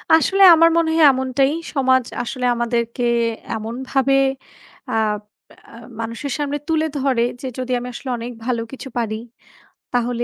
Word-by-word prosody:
আসলে 385 +5 +3
আমার 330 +1 +6
মনে 335 -1 +2
হয় 320 - +6
এমনটাই। 265 +1 +1 0.2
সমাজ 260 -2 +3 0.2
আসলে 250 +1 -4
আমাদেরকে 235 0 -2 0.5
এমনভাবে 260 +5 -1 0.8
আপ 215 -2 0 0.5
আ - - -12 0.3
মানুষের 230 +5 -5
সামনে 290 0 -1
তুলে 320 -1 +1
ধরে, 265 -3 +1 0.2
যে 265 - -4
যদি 255 0 -4
আমি 245 - -7
আসলে 260 - -7
অনেক 235 +1 -6
ভালো 240 -2 -1
কিছু 270 0 -8
পারি, 225 -2 -1 0.8
তাহলে 240 0 0
255 Hz, 140 wpm, -20 LUFS, 235-275 Hz, 0.8 s, আমার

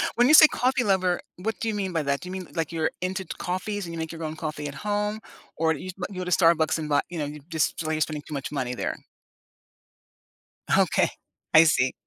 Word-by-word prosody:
When 245 +1 +4
you 305 - +5
say 310 0 +11
coffee 255 -1 +1
lover, 185 -3 +1 0.2
what 220 +4 -3
do 225 - -2
you 215 - -1
mean 190 -3 -2
by 165 - +1
that? 140 0 0
Do 180 - -8
you - - -6
mean, 185 -2 -6
like, 165 -1 -1
you're 160 -1 0
into 190 +1 -2
into - - -8
coffees 190 +2 -3
and 170 - -7
you - - -5
make 160 0 -4
your 165 0 -7
own 155 0 -4
coffee 155 -2 -4
at 145 - -7
home, 210 +1 -2 0.4
or 160 0 +2
you 160 +5 -7
s 185 - -6
uh, - - -1
you 185 - -6
go - - -4
to 180 - -4
Starbucks 165 -2 +4
and 155 -1 -4
buy 145 -1 +3
you 170 -2 -5
know, 145 - -1
you 150 +1 -7
just 160 -2 +1
it's - - -5
like 155 0 -1
you're 155 - -3
spending 150 -1 -1
too 150 - -7
much 140 0 -4
money 130 -4 -2
there? - - -3 1.8
Okay. - - +3 0.4
I 160 - +9
see. 130 -5 +2
165 Hz, 260 wpm, -26 LUFS, 155-190 Hz, 1.8 s, say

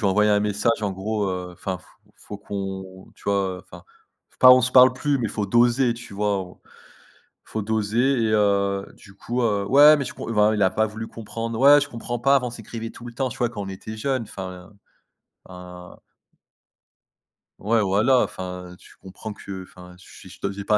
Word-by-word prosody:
ai 100 -4 +2
envoyé 105 +2 +3
un 105 - +3
message 105 +2 0
en 105 - 0
gros, 100 +1 -2 0.2
enfin: 90 +1 -5
«faut 90 - -22 0.3
faut 105 - -9
qu'on, 95 -2 -7
tu - - -22
vois, 95 -2 -1
enfin - - -14 0.6
pas 130 - +9
on 130 - +6
se 125 +2 -1
parle 130 0 +7
plus, 140 +2 -1
mais 120 - -1
il - - -8
faut 105 -2 -3
doser», 120 +3 +3
tu 120 -2 -11
vois? 100 -1 0
On 90 -1 -14 0.9
faut 110 - -4
doser 110 +4 +1
et 110 - 0
heu, 100 -2 +1
du 100 - -17
coup, 120 +5 -3
heu 100 -3 0
ouais 145 +7 +7
mais 140 - -3
tu - - -7
com - - -8
enfin 105 0 +3
il 105 - -1
a 95 - +4
pas 110 +3 +1
voulu 110 +1 -7
comprendre, 115 +1 -6
«ouais 145 +2 +7
je 140 - -3
comprends 120 +1 -5
pas, 135 +3 +4
avant 125 -2 +1
on - - -6
s'écrivait 115 -1 -7
tout 120 - -11
le 120 - -9
temps, 130 +2 -2
tu 110 - -10
vois, 120 - +1
quand 105 -4 -6
on 95 - -7
était 110 +3 -8
jeune». 130 +3 -1
Enfin, 95 -2 -9 0.8
un 90 -1 -11 1.6
Ouais 110 +3 +1
voilà, 105 +6 +3
enfin 90 -1 -7
tu - - -18
comprends 100 +3 -8
que, 95 -2 -8
enfin 90 0 -14
je - - -17
suis - - -14
je - - -14
te 100 - -2
j'ai 100 +1 -7
pas 105 +1 +3
105 Hz, 210 wpm, -23 LUFS, 95-120 Hz, 1.6 s, pas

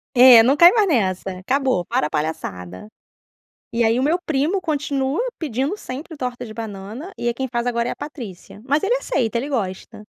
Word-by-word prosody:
É 245 -2 +9
não 270 +4 +3
cai 345 +1 +9
mais 425 -4 +3
nessa, 190 - 0
acabou 255 -4 0
para 150 - 0
a - - -11
palhaçada. 145 - -4 0.9
E 235 - +1
aí 230 +2 +2
o - - +1
meu 320 +5 +2
primo 315 +6 0
continua 285 -3 -1 0.2
pedindo 275 - -2
sempre 305 -2 -8
torta 250 -2 -5
de 215 - -9
banana 220 - -7
e 240 - -3
é 240 - +1
quem 265 +2 -3
faz 240 0 -1
agora 235 0 0
é - - -1
a - - -5
Patrícia. 230 - -9
Mas 290 +2 +1
ele 470 +5 +1
aceita 245 - -1
ele 275 +5 -3
gosta. 210 -4 -4
250 Hz, 195 wpm, -21 LUFS, 215-290 Hz, 0.9 s, É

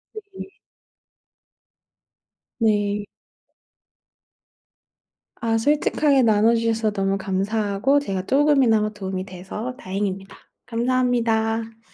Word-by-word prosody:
예예. 405 -2 -9 2.1
네. 205 -2 +1 2.4
아 225 -1 +1
솔직하게 290 +1 +2
나눠 220 +1 +4
주셔서 225 -1 0
너무 195 -1 -1
감사하고 205 +6 0
제가 190 -8 -4
쪼금이나마 265 -6 +3
도움이 190 -3 -5
돼서 195 +6 -6
다행입니다. 195 -2 -4 0.3
감사합니다. 230 -2 0
220 Hz, 205 characters per minute, -22 LUFS, 200-245 Hz, 2.4 s, 나눠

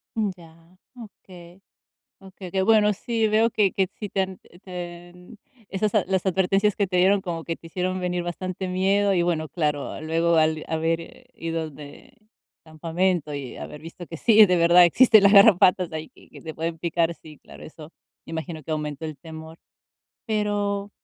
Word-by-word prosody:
Mm, 215 -2 0
ya. 165 +1 -19 0.2
Okey. 185 -5 -14 0.6
Okey, 190 -1 -11
qué 190 +1 0
bueno. 210 0 +4
Sí, 225 +2 -1
veo, 220 +2 +3
que 205 -4 +1
que 190 -2 0
sí 210 - -5
te 195 - -2
han 190 -1 -6
eh, 175 - -19
te 175 -1 -8
en 180 +5 -16 0.3
esas 205 +2 -1 0.2
las 190 -1 -1
advertencias 195 +2 +1
que 200 - +1
te 180 - -3
dieron, 195 +2 +4
como 170 -3 -5
que 165 - -4
te - - -15
hicieron 185 +2 -2
venir 180 -1 -2
bastante 185 +2 -5
miedo 195 +2 +1
y 175 - +2
bueno, 160 -3 -1
claro, 150 -4 -3
luego 165 +2 +1
al 155 0 +1
haber 165 +8 -3
ido 165 -1 -4
de 145 - -14 0.5
campamento 165 0 -2
y 135 -3 -7
haber 150 - -9
visto 165 +2 -10
que 165 - -8
sí, 220 -2 +6
de 180 -3 +2
verdad, 170 +1 +6
existen 220 +4 +5
las 200 - +6
garrapatas, 195 -3 +5
ahí, 155 0 -6
que - - -21
que - - -14
te 160 -2 -7
pueden 165 0 -4
picar, 170 0 -1
sí, 155 -3 -15
claro, - - -14
eso 155 0 -12 0.4
imagino, 160 -1 -6
que 160 - -10
aumentó 150 0 -4
el 155 - -7
temor. 160 +2 -11 0.7
Pero 205 -1 -1
175 Hz, 180 wpm, -24 LUFS, 165-195 Hz, 0.7 s, sí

